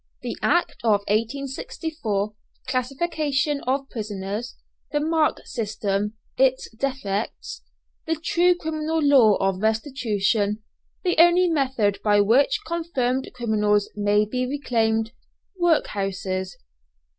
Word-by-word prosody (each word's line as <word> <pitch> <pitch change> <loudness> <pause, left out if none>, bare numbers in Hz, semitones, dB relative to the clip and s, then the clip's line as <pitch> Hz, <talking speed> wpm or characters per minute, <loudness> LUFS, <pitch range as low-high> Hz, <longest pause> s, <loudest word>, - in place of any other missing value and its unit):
THE - - -3
ACT 345 0 +1
OF 210 -3 +3
1864 230 - -2 0.3
CLASSIFICATION 280 +2 -1
OF 270 +1 0
PRISONERS 210 +1 -5 0.4
THE 295 - +1
MARK 315 0 +1
SYSTEM: 210 -3 -2 0.3
ITS 260 -1 +2
DEFECTS 205 - -3 0.5
THE 325 - +1
TRUE 350 +3 +2
CRIMINAL 320 -1 -2
LAW 260 -8 +6
OF 195 -1 0
RESTITUTION 220 -3 0 0.4
THE 355 -3 +1
ONLY 345 +1 +6
METHOD 255 -10 +1
BY 205 -1 +4
WHICH 230 +8 +3
CONFIRMED 280 -6 -1
CRIMINALS 210 -4 +1
MAY 205 0 +2
BE 250 +4 -2
RECLAIMED 225 -5 0 0.5
WORKHOUSES. 195 - 0
245 Hz, 100 wpm, -24 LUFS, 210-290 Hz, 0.5 s, LAW